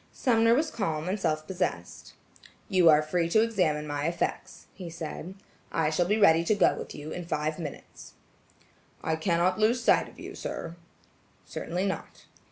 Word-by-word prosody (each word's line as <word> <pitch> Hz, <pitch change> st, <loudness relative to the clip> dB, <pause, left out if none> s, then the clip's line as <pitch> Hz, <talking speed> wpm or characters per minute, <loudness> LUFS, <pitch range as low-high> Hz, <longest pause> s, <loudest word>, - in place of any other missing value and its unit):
Sumner 230 Hz, -2 st, +3 dB
was 310 Hz, +4 st, 0 dB
calm 160 Hz, -7 st, -2 dB
and 195 Hz, +3 st, -1 dB
self 155 Hz, -4 st, -1 dB
possessed. 190 Hz, +1 st, -4 dB, 0.5 s
"You 185 Hz, -5 st, +5 dB
are 155 Hz, 0 st, +6 dB
free 165 Hz, +2 st, 0 dB
to 220 Hz, +5 st, +4 dB
examine 180 Hz, -10 st, 0 dB
my 145 Hz, 0 st, -2 dB
effects," 170 Hz, +1 st, -3 dB
he 180 Hz, -3 st, -8 dB
said. 165 Hz, +2 st, -7 dB, 0.4 s
"I 160 Hz, -1 st, +1 dB
shall 175 Hz, +2 st, +1 dB
be 210 Hz, +3 st, +2 dB
ready 165 Hz, -6 st, +5 dB
to 210 Hz, +5 st, +2 dB
go 200 Hz, -, +4 dB
with -, -, -7 dB
you 150 Hz, +2 st, -7 dB
in 180 Hz, -, -5 dB
five 155 Hz, 0 st, -2 dB
minutes." 150 Hz, -4 st, -9 dB, 0.9 s
"I 160 Hz, -, 0 dB
cannot 175 Hz, +3 st, +1 dB
lose 230 Hz, +3 st, +2 dB
sight -, -, +3 dB
of -, -, -17 dB
you, -, -, -8 dB
sir." 165 Hz, 0 st, -6 dB, 0.7 s
"Certainly 180 Hz, +3 st, -3 dB
not." 195 Hz, -, -5 dB
170 Hz, 170 wpm, -28 LUFS, 155-200 Hz, 0.9 s, are